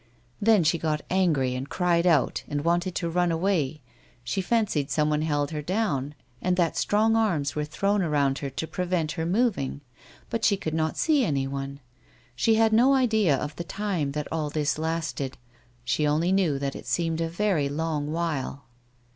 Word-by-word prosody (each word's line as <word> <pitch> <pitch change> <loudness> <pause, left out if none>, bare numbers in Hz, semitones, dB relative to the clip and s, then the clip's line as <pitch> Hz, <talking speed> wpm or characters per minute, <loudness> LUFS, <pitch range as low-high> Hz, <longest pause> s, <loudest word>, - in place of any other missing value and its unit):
Then 210 -3 +5
she 160 +2 +2
got 155 -2 -1
angry, 155 -9 +2
and 130 +2 -5
cried 175 -1 +1
out, 155 -6 +2
and 145 0 -3
wanted 175 +2 +1
to 170 - -1
run 175 +1 +1
away; 160 -4 0 0.4
she 120 +11 -1
fancied 190 -9 0
some 150 -1 +1
one 150 0 +1
held 145 -2 0
her 150 -1 -3
down, 150 -6 -1 0.3
and 180 0 +1
that 170 -3 +1
strong 220 +2 +2
arms 175 -11 +1
were 150 0 -1
thrown 200 +7 0
around 145 -5 +1
her 140 - -4
to 135 +4 -4
prevent 175 -1 -1
her 160 +2 -3
moving, 185 - 0 0.5
but 230 -1 -2
she 200 - +4
could 155 -4 -4
not 160 -1 -1
see 300 -4 +3
anyone. 140 - -2 0.5
She 220 - +3
had 220 0 +3
no 255 +5 +5
idea 220 - +3
of 150 +2 -5
the 170 - -3
time 175 -4 -2
that 150 0 -3
all 155 -2 -1
this 150 0 -1
lasted; 160 -4 -3 0.5
she 150 +4 +1
only 160 +5 +1
knew 185 -7 +2
that 140 0 -3
it - - -9
seemed 165 -1 0
a 165 - -1
very 170 -5 0
long 150 0 -2
while. 155 -4 -3
160 Hz, 180 wpm, -26 LUFS, 145-190 Hz, 0.5 s, Then